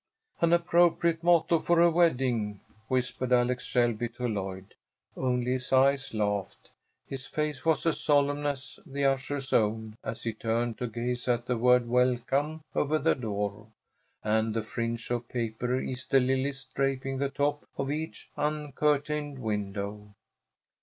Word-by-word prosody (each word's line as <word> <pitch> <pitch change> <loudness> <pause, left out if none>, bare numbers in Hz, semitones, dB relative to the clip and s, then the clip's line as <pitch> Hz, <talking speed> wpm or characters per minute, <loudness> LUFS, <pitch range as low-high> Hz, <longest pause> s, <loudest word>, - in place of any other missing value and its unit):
"An 170 -1 +3
appropriate 170 -1 +3
motto 170 -1 +4
for 170 +1 +2
a 170 0 +6
wedding," 125 - +1 0.3
whispered 125 0 -1
Alex 125 +1 +2
Shelby 120 -2 +1
to 120 +1 -4
Lloyd. 95 -3 -4 0.4
Only 125 -1 0
his 130 0 -2
eyes 135 -1 +3
laughed. 105 -2 -2 0.3
His 135 -2 -7
face 150 -3 -2
was 160 -2 +2
as 165 - +1
solemn 145 0 +2
as 140 -1 -5
the 140 0 -2
usher's 135 0 -1
own 110 0 +1
as 115 - -5
he 115 - -2
turned 115 +2 -1
to 125 - -1
gaze 120 +2 -3
at 120 -1 +1
the 125 - 0
word 125 +1 +4
"Welcome" 130 +5 +1
over 150 +2 +1
the 155 +2 +3
door, 105 -3 -3 0.6
and 110 +1 +1
the 115 - 0
fringe 115 +2 -4
of 120 -1 -2
paper 120 +1 -1
Easter 130 +1 +1
lilies 135 +1 0
draping 135 -1 -1
the 140 0 0
top 145 +1 -1
of 135 +1 -1
each 155 +2 -5
uncurtained 150 -1 0
window. 105 -2 -4
130 Hz, 145 wpm, -29 LUFS, 115-145 Hz, 0.6 s, a